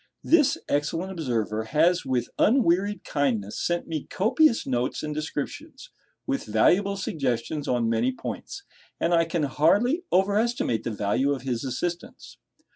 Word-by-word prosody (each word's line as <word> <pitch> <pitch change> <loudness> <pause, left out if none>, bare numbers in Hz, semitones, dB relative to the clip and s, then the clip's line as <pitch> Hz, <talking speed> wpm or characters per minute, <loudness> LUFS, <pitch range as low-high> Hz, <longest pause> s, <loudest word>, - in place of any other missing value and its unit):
This 310 -5 +4
excellent 165 +6 -1
observer 115 - -2
has 165 +8 +2
with 125 -2 -1
unwearied 205 -4 +2
kindness 115 -8 -1
sent 175 0 -1
me 155 -3 -4
copious 240 +6 +2
notes 125 -1 -1
and 150 0 -3
descriptions, 290 - -6 0.3
with 275 -1 -2
valuable 195 - +3
suggestions 140 -4 -2
on 120 -2 +1
many 115 +3 +1
points; 395 - -7 0.4
and 170 - +1
I 165 -1 +4
can 165 -1 -2
hardly 205 - +2
over 195 +2 +3
estimate 235 - 0
the - - -2
value 105 +6 0
of 130 -3 -6
his 125 -4 -2
assistance. 170 +7 -5
155 Hz, 140 wpm, -25 LUFS, 125-200 Hz, 0.4 s, This